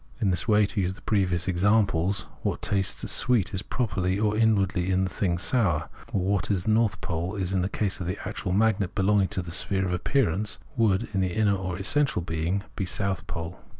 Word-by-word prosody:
In 105 -6 +2
this 90 +4 -1
way, 105 -1 +5
to 100 +1 -2
use 95 0 -1
the - - -16
previous 90 -4 0
examples, 95 -1 +2 0.2
what - - -2
tastes 95 -2 0
sweet 120 -7 +2
is 95 - -1
properly, 100 -6 -1
or 105 0 +1
inwardly 100 -5 +2
in 95 0 +2
the 95 - -2
thing, 90 -4 0
sour; 90 - +1 0.2
or 95 - 0
what 100 +2 0
is 95 -3 0
north 110 -1 +2
pole 85 +3 -3
in 95 -1 -1
the 90 - -1
case 100 -1 -1
of 90 - -4
the 95 +3 -2
actual 90 - -4
magnet 100 -2 +1
belonging 100 0 +3
to 95 - -3
the 85 - -8
sphere 95 +2 +1
of 90 - -1
appearance, 105 - 0 0.2
would 110 -6 +3
be, - - -7
in 95 - +1
the 90 -2 0
inner 105 -2 +3
or 90 -2 -4
essential 125 - +1
being, 85 +4 -2 0.2
south 95 -1 -2
pole. 85 +2 -6
95 Hz, 205 wpm, -26 LUFS, 90-105 Hz, 0.2 s, way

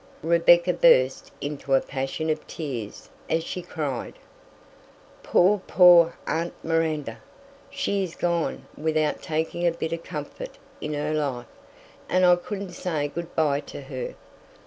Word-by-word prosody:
Rebecca 170 +2 +5
burst 130 - +4
into 140 -1 -1
a - - +5
passion 135 +4 -3
of 155 - -4
tears 125 -10 -6 0.2
as 165 0 +1
she 180 - -5
cried, 145 -8 -4 1.1
"Poor, 195 +2 +3
poor 175 -2 +7
aunt 165 +2 -2
Miranda! 155 -8 -1 0.5
She 200 -8 -1
is 170 -3 -6
gone 170 -2 -1
without 155 -1 0
taking 160 +2 -1
a - - +4
bit 165 -1 -4
of 165 - -4
comfort - - -7 0.2
in 150 - -3 0.2
life, 135 -5 -2 0.6
and 185 0 +4
I 180 0 +7
couldn't 195 +1 -6
say 160 -5 -2
good 170 +3 -7
by 145 -3 +2
to 145 - -9
her! 135 -1 -6
160 Hz, 135 wpm, -25 LUFS, 145-175 Hz, 1.1 s, poor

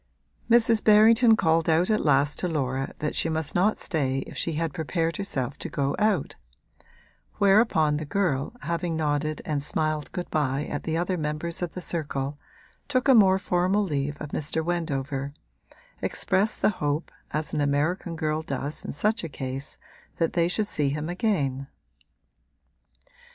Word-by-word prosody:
Mrs. 230 -1 +4
Berrington 225 +2 +6
called 165 -3 +2
out 170 +6 +3
at 215 - +1
last 145 0 +2
to 180 - -1
Laura 135 -4 -2
that 150 - -3
she 165 - +1
must 160 -2 -2
not 195 +5 +2
stay 135 -4 -1
if - - -11
she 165 - -1
had 160 -1 -2
prepared 165 0 -1
herself 140 -9 -2
to - - -5
go 140 -1 -1
out: 210 -7 +1 1.0
whereupon 195 -7 +3
the 155 - -4
girl, 145 -2 0
having 170 0 -2
nodded 155 -1 -1
and 150 -2 -1
smiled 155 0 -1
good 180 - -4
bye 145 -1 0
at 145 - -5
the 160 0 -1
other 180 +1 -1
members 155 +3 -3
of 175 -2 -3
the 180 - -6
circle, 145 -3 -2 0.5
took 255 -2 0
a 270 - +7
more 195 -5 +6
formal 190 +2 +1
leave 145 -5 -2
of 150 - -6
Mr. 155 +2 -2
Wendover 140 -5 -2 0.7
expressed 205 +3 0
the - - +5
hope, 145 +2 -1 0.2
as 155 -1 -3
an 150 - 0
American 155 +5 0
girl 155 -1 -1
does 145 0 -4
in - - -5
such 210 +10 0
a 165 - -4
case, 135 0 -6 0.4
that 165 - 0
they 170 -1 +2
should 210 +4 0
see 150 -7 0
him 150 +3 -3
again. 150 - -1
160 Hz, 160 wpm, -26 LUFS, 145-180 Hz, 1.0 s, a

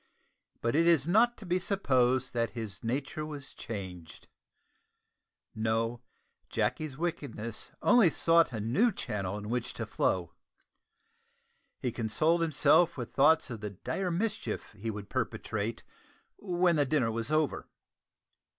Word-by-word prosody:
But 115 +2 0
it 165 +2 +4
is 165 -4 +4
not 230 +6 +4
to 215 - -10
be 180 +1 +1
supposed 130 -10 +1
that 115 -1 0
his 105 -3 -5
nature 135 +6 -2
was 145 -3 -7
changed. 95 -7 -8 1.3
No 115 +2 -1 0.5
Jacky's 125 +6 -1
wickedness 130 -9 -4
only 230 -8 +6
sought 165 -1 +3
a 110 - -4
new 150 - +2
channel 100 - -3
in 105 0 -7
which 120 +1 -2
to - - -3
flow. - - -1 1.4
He 125 - -2
consoled 155 +10 +1
himself 160 0 +4
with 120 -3 -6
thoughts 145 0 +4
of 115 -3 -6
the 105 - -3
dire 180 - -3
mischief 210 +6 -2
he 110 +2 -5
would 105 -2 -6
perpetrate 110 +2 -3 0.6
when 175 -3 +2
the 145 - +3
dinner 130 -6 +2
was 115 +5 -3
over. 155 -2 0
130 Hz, 130 wpm, -30 LUFS, 115-165 Hz, 1.4 s, only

